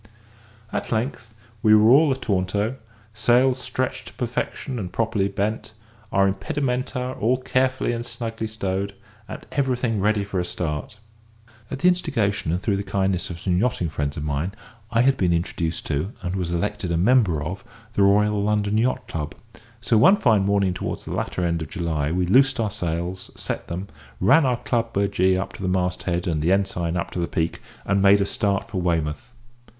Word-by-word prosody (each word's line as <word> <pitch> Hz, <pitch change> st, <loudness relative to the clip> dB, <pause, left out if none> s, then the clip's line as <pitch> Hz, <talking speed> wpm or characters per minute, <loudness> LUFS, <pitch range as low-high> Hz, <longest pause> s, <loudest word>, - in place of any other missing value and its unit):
At -, -, -3 dB
length 115 Hz, -1 st, -2 dB, 0.3 s
we 110 Hz, 0 st, +6 dB
were 110 Hz, +2 st, +6 dB
all 145 Hz, +2 st, +6 dB
ataunto; 105 Hz, -1 st, -1 dB, 0.4 s
sails 125 Hz, +4 st, +3 dB
stretched 130 Hz, +1 st, -3 dB
to -, -, -11 dB
perfection 125 Hz, +1 st, -3 dB
and 90 Hz, -4 st, -5 dB
properly 110 Hz, -3 st, 0 dB
bent, 105 Hz, +2 st, -3 dB, 0.4 s
our 100 Hz, 0 st, +4 dB
impedimenta 125 Hz, +5 st, -2 dB
all 120 Hz, +4 st, +2 dB
carefully 130 Hz, 0 st, 0 dB
and 120 Hz, 0 st, -3 dB
snugly 115 Hz, -2 st, -5 dB
stowed, 100 Hz, -2 st, -3 dB, 0.3 s
and -, -, -8 dB
everything 125 Hz, -5 st, 0 dB
ready 105 Hz, +1 st, +2 dB
for 100 Hz, -2 st, -3 dB
a -, -, 0 dB
start. 85 Hz, +2 st, -4 dB, 0.7 s
At -, -, -4 dB
the 175 Hz, -, +2 dB
instigation 115 Hz, -, +1 dB
and 90 Hz, -, 0 dB
through 100 Hz, +1 st, 0 dB
the -, -, -2 dB
kindness 95 Hz, -3 st, -1 dB
of 85 Hz, -1 st, -6 dB
some 90 Hz, -1 st, 0 dB
yachting 100 Hz, -7 st, 0 dB
friends 75 Hz, 0 st, -2 dB
of 75 Hz, -, -3 dB
mine, 75 Hz, +5 st, -2 dB, 0.4 s
I 115 Hz, 0 st, +2 dB
had 135 Hz, +1 st, +3 dB
been 90 Hz, -5 st, +2 dB
introduced 85 Hz, 0 st, -2 dB
to 80 Hz, -, -2 dB
and 90 Hz, +1 st, -2 dB
was 90 Hz, -3 st, -2 dB
elected 85 Hz, +1 st, -2 dB
a 85 Hz, -, +1 dB
member 95 Hz, -, +3 dB
of 95 Hz, +6 st, -5 dB, 0.3 s
the 100 Hz, -, +1 dB
Royal 105 Hz, +1 st, +4 dB, 0.3 s
Yacht 115 Hz, +4 st, +1 dB
Club; 75 Hz, -2 st, -4 dB, 0.5 s
so 115 Hz, -1 st, +3 dB
one 190 Hz, -, +7 dB
fine 110 Hz, -, +3 dB
morning 100 Hz, -2 st, +2 dB
towards -, -, -4 dB
the -, -, -5 dB
latter 90 Hz, -, -2 dB
end 85 Hz, -1 st, 0 dB
of 80 Hz, -, -5 dB
July 80 Hz, -5 st, -1 dB
we 90 Hz, +1 st, +1 dB
loosed 135 Hz, +8 st, +4 dB
our 110 Hz, -3 st, 0 dB
sails, 85 Hz, +2 st, -3 dB
set -, -, -4 dB
them, 90 Hz, +4 st, -5 dB, 0.3 s
ran 135 Hz, -, +5 dB
our 125 Hz, -2 st, +1 dB
Club 115 Hz, -1 st, -1 dB
burgee 95 Hz, -2 st, +2 dB
up 95 Hz, +1 st, -4 dB
to -, -, -10 dB
the 95 Hz, -, -1 dB
mast 90 Hz, 0 st, 0 dB
head 85 Hz, 0 st, -1 dB
and 80 Hz, -4 st, 0 dB
the 85 Hz, +4 st, +2 dB
ensign 90 Hz, -3 st, 0 dB
up 85 Hz, -, -3 dB
to -, -, -4 dB
the 85 Hz, -, 0 dB
peak, 80 Hz, 0 st, -2 dB, 0.2 s
and 100 Hz, 0 st, +2 dB
made 100 Hz, +1 st, +6 dB
a 100 Hz, -, +2 dB
start 100 Hz, -1 st, 0 dB
for 100 Hz, -5 st, -3 dB
Weymouth. 85 Hz, +6 st, -1 dB
100 Hz, 185 wpm, -23 LUFS, 90-115 Hz, 0.7 s, one